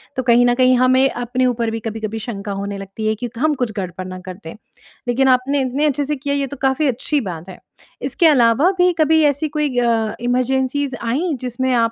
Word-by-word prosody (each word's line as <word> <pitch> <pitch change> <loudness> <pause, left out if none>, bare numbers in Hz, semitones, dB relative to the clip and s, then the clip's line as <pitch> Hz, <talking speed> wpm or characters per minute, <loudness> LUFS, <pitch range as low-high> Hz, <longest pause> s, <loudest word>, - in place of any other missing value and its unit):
तो 260 - -2
कहीं 245 0 +4
न 245 - +3
कहीं 255 0 +4
हमें 255 +2 +4
अपने 245 +1 -1
ऊपर 235 -2 0
भी 225 - -3
कभी-कभी 220 0 -4
शंका 205 -3 -6
होने 200 0 -4
लगती 195 +3 -5
है 220 - +1
कि 245 - -2
हम 305 +4 +2
कुछ 225 - -2
गड़बड़ 185 -1 -5
ना 185 0 -7
कर 185 - -6
दें, 160 - -8 0.5
लेक़िन 265 +2 +2
आपने 265 +2 +2
इतने 265 +4 0
अच्छे 290 0 +1
से 300 +2 -1
किया 280 +1 -3
ये 275 -1 -1
तो 285 - -8
काफ़ी 270 +3 +2
अच्छी 270 +3 -1
बात 175 -3 -7
है। 185 - -10 0.4
इसके 345 -4 +2
अलावा 275 +4 +4
भी 360 0 +4
कभी 315 +1 +4
ऐसी 290 +2 +1
कोई 295 -4 -2
अ, 225 -3 +1
इमरजेंसीस 260 +2 0
आईं 285 +7 -1
जिसमें 255 +1 -2
आप 230 -1 +2
250 Hz, 215 wpm, -19 LUFS, 225-280 Hz, 0.5 s, कहीं